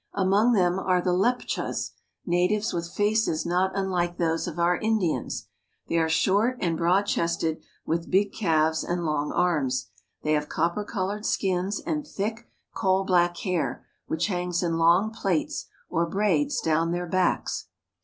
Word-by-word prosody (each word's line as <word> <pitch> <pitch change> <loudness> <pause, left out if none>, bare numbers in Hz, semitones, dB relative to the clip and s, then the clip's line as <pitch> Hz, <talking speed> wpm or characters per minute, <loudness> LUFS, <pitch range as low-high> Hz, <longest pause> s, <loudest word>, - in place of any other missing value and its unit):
Among 200 +5 +3
them 180 -3 +2
are 185 -1 +2
the 180 0 +1
Leptchas, 240 +7 -1 0.3
natives 185 +5 +1
with 170 -1 -3
faces 205 -5 +1
not 185 +2 +1
un 190 -1 -1
like 175 -1 -1
those 165 0 0
of 170 - -6
our 175 +1 +2
Indians. 215 -7 -1 0.4
They 170 - +1
are 160 0 +1
short 205 +9 +2
and 170 -2 0
broad 175 +4 +3
chested, 170 -4 -1 0.2
with 165 +1 -2
big 195 +1 +2
calves 160 -5 +1
and 175 -1 -2
long 150 -1 -1
arms. 135 -8 0 0.3
They 155 - 0
have 150 -1 0
copper 170 +6 0
colored 205 +1 -3
skins 190 +1 0
and 300 -2 -3
thick, 220 +2 -4 0.2
coal 190 0 +2
black 175 -2 +2
hair, 180 -4 -2 0.2
which 160 +1 0
hangs 180 -2 -1
in 165 -1 0
long 175 +6 +4
plaits 190 -7 -1 0.2
or 170 0 0
braids 190 -6 +1
down 165 +1 +1
their 175 +1 -2
backs. 185 +1 0
180 Hz, 155 wpm, -26 LUFS, 165-195 Hz, 0.4 s, long